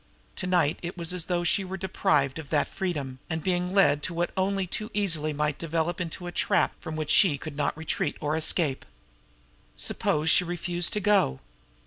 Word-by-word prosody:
To 180 - -3
night 175 -5 +2
it 175 +1 -6
was 170 0 -1
as 180 -3 -1
though 175 -1 0
she 185 +3 +2
were 190 +1 -5
deprived 150 -6 +1
of 150 - -9
that 150 - +2
freedom, 145 -9 -4
and 160 -2 -3
being 180 -1 0
led 190 -7 +4
into 170 +3 -5
what 175 +1 0
only 195 0 0
too 215 +4 -4
easily 165 -7 0
might 150 0 -1
develop 165 +1 -1
into 175 +1 -5
a 175 - -4
trap - - +1
from 160 - -6
which 155 -1 -1
she 185 -8 +6
could 155 0 -8
not 145 0 -1
retreat 160 +1 -2
or 150 +1 -1
escape. 155 -3 +1 0.9
Suppose 150 +1 -1
she - - +5
refused 175 0 -1
to 210 - +1
go? 200 - +3
170 Hz, 190 wpm, -27 LUFS, 150-180 Hz, 0.9 s, she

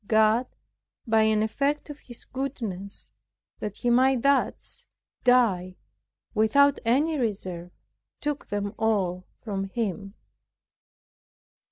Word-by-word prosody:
God 220 +3 +4 0.6
by 225 -2 +3
an 220 0 +3
effect 285 +6 -1
of 295 - -10
His 240 -2 -9
goodness, 225 -8 -5 0.5
that 210 -1 -5
he 240 - +1
might 255 0 +4
thus 280 -1 +1 0.4
die 205 -8 +3 0.6
without 275 +6 +4
any 285 +7 +2
reserve, 185 -7 -3 0.5
took 295 -1 -3
them 205 -1 -2
all 190 -5 0
from 195 -3 -3
him. 200 -1 -3
220 Hz, 100 wpm, -26 LUFS, 200-260 Hz, 0.6 s, God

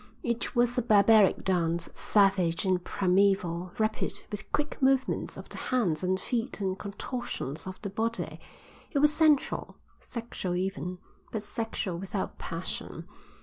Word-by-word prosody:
It 235 +1 -2
was 240 0 +3
a - - +2
barbaric 215 -2 +5
dance, 170 -2 +1
savage 195 -4 +3
and 185 -2 +2
primeval, 185 -2 +2
rapid, 220 0 -1
with 210 0 -6
quick 295 -1 -1
movements 265 0 +2
of - - -8
the - - -8
hands 210 -12 +1
and 185 0 +1
feet 240 +1 -2
and 190 -2 0
contortions 200 - -5
of 185 - -7
the 200 - -2
body; 230 +3 -2 0.5
it - - -2
was 300 +1 +5
sensual, 305 -3 +2 0.2
sexual 230 -7 -4
even, 185 -1 -2 0.3
but 215 -2 -3
sexual 215 -5 -3
without 195 +1 -4
passion. - - -5
200 Hz, 140 wpm, -29 LUFS, 185-235 Hz, 0.5 s, barbaric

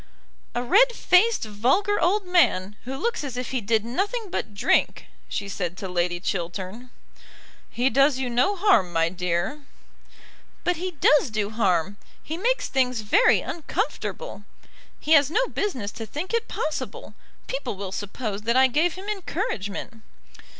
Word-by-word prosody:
"A 245 - 0
red 475 - +5
faced 430 +2 +3
vulgar 260 - +1
old 390 +3 +2
man, 210 - +2
who 265 +2 -4
looks 470 - -1
as 265 -4 -5
if 250 - -4
he 260 -2 -1
did 220 +1 +1
nothing 400 - -2
but 205 - -3
drink," 200 - +1 0.2
she 200 - -3
said 180 -3 -4
to 190 - -5
Lady 175 -1 -1
Chiltern. 190 +6 -4 0.8
"He 245 +2 0
does 275 0 +4
you 260 -1 -2
no 250 +11 +2
harm, 345 - +3
my 165 0 +2
dear." 180 - -2 1.0
"But 355 -1 +1
he 365 +2 -4
does 300 -3 +4
do 215 -1 -2
harm. 200 -3 +1 0.3
He 315 - -4
makes - - 0
things 255 -3 0
very 215 - +4
uncomfortable. 410 +8 -4 0.6
He 305 - -4
has 285 -3 +6
no 475 +10 +2
business 255 - -2
to 225 - -7
think 315 - -5
it 465 0 0
possible. 310 - -4 0.3
People - - -4
will 195 -1 -6
suppose 205 +1 -4
that 235 +3 +1
I 265 - +7
gave 310 +7 +2
him 380 +2 -9
encouragement." 335 - -4
255 Hz, 155 wpm, -25 LUFS, -, 1.0 s, I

